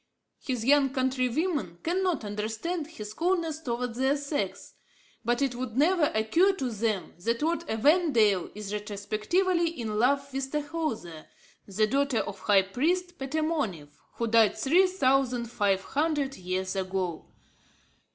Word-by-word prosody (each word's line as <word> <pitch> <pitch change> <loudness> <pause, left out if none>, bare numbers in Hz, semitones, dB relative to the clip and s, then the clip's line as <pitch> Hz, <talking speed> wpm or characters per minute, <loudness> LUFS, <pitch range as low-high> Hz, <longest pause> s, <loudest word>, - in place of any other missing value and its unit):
His 250 -4 -3
young 280 0 +5
countrywomen 260 - -1
cannot 355 - 0
understand 220 - -3
his 215 -10 -8
coldness 335 0 0
towards 245 -4 -3
their 270 +2 +2
sex. 285 +1 -4 0.5
But 240 +4 +1
it 270 -3 0
would 245 -1 -5
never 330 +3 +4
occur 330 - +3
to 265 -10 -3
them 215 -2 -2
that 230 +5 0
Lord 335 +2 +1
Evandale 225 - +3
is 210 -1 -6
retrospectively 215 - 0
in 225 -9 -4
love 275 +3 +1
with 270 0 -3
Tahoser, 290 - -4 0.4
the 210 +2 +1
daughter 275 +2 +1
of 200 -1 -6
the - - -18
high 195 -2 +5
priest 345 - -1
Petamounoph, 270 - -2 0.2
who 235 - -1
died 225 -1 +4
three 355 +8 +4
thousand 265 -8 +1
five 195 -4 +1
hundred 290 -1 -1
years 185 0 -3
ago. 185 -3 -3
255 Hz, 135 wpm, -28 LUFS, 215-310 Hz, 0.5 s, young